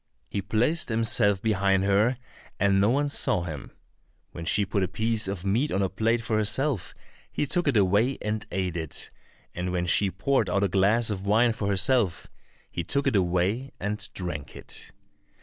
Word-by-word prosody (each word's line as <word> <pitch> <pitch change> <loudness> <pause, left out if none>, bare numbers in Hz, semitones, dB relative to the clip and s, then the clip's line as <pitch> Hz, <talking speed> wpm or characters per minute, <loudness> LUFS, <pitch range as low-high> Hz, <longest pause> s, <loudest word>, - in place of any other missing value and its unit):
He 100 - -1
placed 115 - 0
himself 105 -3 +2
behind 95 -3 +2
her, 105 +6 +2 0.4
and 100 0 +3
no 105 - +4
one 145 +4 +1
saw 95 -10 0
him. 80 -5 -7 0.6
When 85 - -7
she 100 +4 +3
put 100 +1 -1
a 95 - +1
piece 110 +3 -1
of 95 -1 -4
meat 115 +10 +1
on 100 - +1
a 95 - 0
plate 115 +4 0
for 110 -1 0
herself, 110 - 0 0.4
he - - -1
took 175 +5 -1
it 135 -5 +3
away 105 +7 +2
and 105 0 -3
ate 90 -2 -2
it, 80 -3 -3 0.4
and 90 +1 -3
when 90 -1 -1
she 95 +3 +3
poured 130 +9 0
out 100 -1 +1
a - - +3
glass 105 +5 +2
of 100 -1 -5
wine 115 +3 +4
for 110 -2 -3
herself, 100 - +2 0.5
he 85 - -3
took 140 - 0
it - - +1
away 95 +8 0
and 105 +3 -2
drank 70 -8 -5
it. - - -7
100 Hz, 185 wpm, -26 LUFS, 95-115 Hz, 0.6 s, no